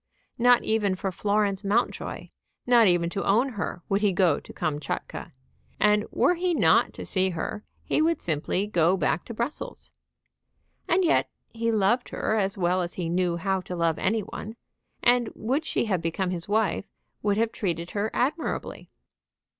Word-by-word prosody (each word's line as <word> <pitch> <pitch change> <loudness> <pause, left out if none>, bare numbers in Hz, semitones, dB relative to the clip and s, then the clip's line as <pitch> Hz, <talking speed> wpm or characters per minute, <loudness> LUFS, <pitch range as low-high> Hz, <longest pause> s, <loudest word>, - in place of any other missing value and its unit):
Not 245 0 +5
even 210 -3 +1
for 190 +1 -3
Florence 205 +1 0
Mountjoy, 205 +4 -1 0.4
not 240 -3 +6
even 175 -2 +3
to 195 - -2
own 235 +7 +3
her, 200 -6 -5
would 200 +1 +1
he 205 -2 +3
go 175 -5 +3
to - - -13
Kamtchatka; 150 -2 -4 0.5
and 210 +1 +3
were 360 - +3
he 355 0 0
not - - +4
to - - -7
see 190 -1 +1
her 185 +5 -4 0.2
he - - +1
would 330 +1 +2
simply 165 +4 -1
go 180 -2 +2
back 170 0 0
to 235 - -7
Brussels. 235 +7 -4 1.0
And 360 +2 +3
yet 335 - +2 0.2
he 230 0 -1
loved 220 +4 +2
her 220 - -1
as 200 -2 0
well 180 0 +1
as 175 0 -4
he 170 -3 -3
knew 175 0 +1
how 190 +2 -1
to 180 0 -6
love 165 -2 0
any 220 +3 +1
one, 215 +2 -7 0.5
and, 245 -2 +3
would 270 +8 -1
she - - 0
have 190 -6 0
become 180 +3 -1
his 175 +1 -5
wife, 205 -3 +1 0.4
would 205 -1 +1
have 225 0 +1
treated 170 -3 -3
her 210 +1 -1
admirably. 300 +6 -2
200 Hz, 170 wpm, -26 LUFS, 180-230 Hz, 1.0 s, not